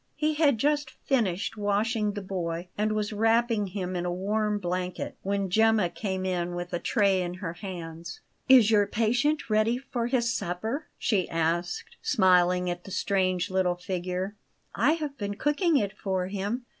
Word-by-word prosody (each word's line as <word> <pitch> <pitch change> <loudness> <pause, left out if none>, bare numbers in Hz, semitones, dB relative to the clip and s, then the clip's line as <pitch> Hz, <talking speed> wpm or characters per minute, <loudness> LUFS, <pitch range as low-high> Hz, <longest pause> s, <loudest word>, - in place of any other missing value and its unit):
He 310 0 +1
had 295 -5 +3
just 295 +4 +1
finished 225 -5 -1
washing 210 +1 0
the 205 -1 -5
boy, 175 -2 -4
and 215 +1 0
was 215 0 -1
wrapping 225 0 +2
him 185 -1 -4
in 175 - -1
a 175 - -1
warm 210 +3 0
blanket, 180 -1 -3
when 200 0 -1
Gemma 220 -2 +4
came 190 -1 -3
in 175 -1 -1
with 175 +1 -5
a 175 - 0
tray 200 -4 +2
in 175 0 -3
her 180 -3 -5
hands. 170 -2 -7 0.3
"Is 245 -5 +7
your 205 -2 +4
patient 245 +8 +1
ready 215 +2 +2
for 250 -3 -3
his 235 -2 +1
supper?" 220 - -3
she 195 -6 0
asked, 165 +2 -1
smiling 180 -5 +3
at 175 0 -3
the - - -8
strange 185 -2 0
little 185 -1 +1
figure. 180 +2 -3 0.4
"I 260 +9 +3
have 300 -5 -4
been 205 -1 -3
cooking 295 - +2
it 205 -4 -1
for 190 -3 -2
him." 205 +5 -3
200 Hz, 170 wpm, -27 LUFS, 180-225 Hz, 0.4 s, Is